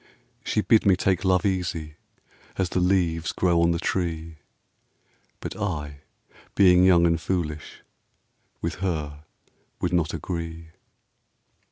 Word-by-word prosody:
She 105 - 0
bid 110 0 +4
me 95 -2 +5
take 95 0 0
love 95 +1 +2
easy, 85 -5 -2 0.6
as 95 -2 0
the 90 - -1
leaves 90 -3 +1
grow 85 -2 +2
on 85 - +3
the 85 - +1
tree; 80 -2 -3 1.0
But - - -6
I, 75 -9 -4 0.6
being 90 -2 +6
young 90 -2 +5
and 85 -1 +1
foolish, 80 -3 -4 0.8
with - - -3
her 75 -5 -3 0.5
would 90 - -2
not 85 -3 +1
agree. 85 0 -6
85 Hz, 125 wpm, -25 LUFS, 80-95 Hz, 1.0 s, being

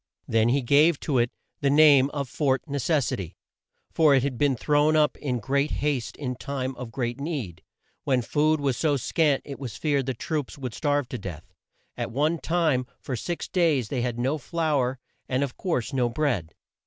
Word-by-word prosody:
Then 115 0 +3
he 135 +2 +2
gave 145 +5 +4
to 135 -5 +1
it 120 0 +2 0.3
the 140 - +1
name 145 -2 +6
of 140 -2 -3
Fort 135 0 0
Ne 145 -2 -3
ces 145 -1 +1
si - - -1
ty, 90 -5 -7 0.6
for 155 -4 +5
it 130 - +3
had 140 -2 -1
been 140 +1 +2
thrown 150 +4 +2
up 150 -3 +3
in 130 -4 -2
great 140 +6 0
haste 145 -5 -2
in 125 -4 -4
time 130 +4 -4
of 125 -2 -7
great 120 +1 -3
need, 140 - -4 0.4
when 130 -3 +1
food 155 +5 +2
was 140 -3 0
so 145 +1 +1
scant 145 +2 +1
it 140 -4 -8
was 130 -5 -6
feared 140 -4 0
the 130 - -1
troops 150 +4 -3
would 130 -5 -5
starve 145 -1 0
to 125 - -5
death. 85 -5 -8 0.4
At - - -3
one 155 +6 0
time, 155 -7 +1
for 130 - -4
six 170 +9 -4
days 155 - +1
they 130 -4 -1
had 120 -1 -2
no 135 +6 0
flour, 145 -4 0 0.3
and, 130 +2 +1
of 135 -3 -4
course, 165 - -2
no 125 -2 +1
bread. 115 - -1
140 Hz, 200 wpm, -26 LUFS, 125-150 Hz, 0.6 s, name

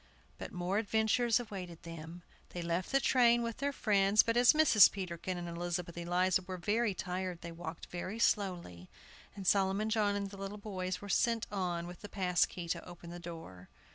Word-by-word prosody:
But - - -6
more 180 +3 -1
adventures 220 +2 +2
awaited 185 -7 -7
them. 165 +1 -9 0.3
They 175 - -4
left 170 +2 -2
the 275 - +4
train 240 -3 +4
with 230 -1 -4
their 285 +1 -1
friends; 205 -4 +3
but 230 - 0
as 245 +3 +6
Mrs. 300 -10 +7
Peterkin 185 -1 -4
and 175 0 -5
Elizabeth 170 0 -4
Eliza 180 +2 +1
were 185 0 -6
very 210 +3 0
tired, 180 -1 -4
they 170 - -7
walked 165 0 -7
very 185 +4 -5
slowly, 175 - -1 0.5
and 195 -2 -7
Solomon 195 +3 +2
John 210 -2 +2
and 200 -1 -3
the 200 - -10
little 195 +1 -6
boys 185 -3 -4
were 205 - -8
sent 230 +2 +1
on 180 -4 -2
with 175 0 -10
the 205 - -8
pass 180 -3 +2
key 175 -2 -7
to 170 0 -2
open 175 -1 -11
the 175 - -7
door. 165 - -10
185 Hz, 190 wpm, -33 LUFS, 175-210 Hz, 0.5 s, Mrs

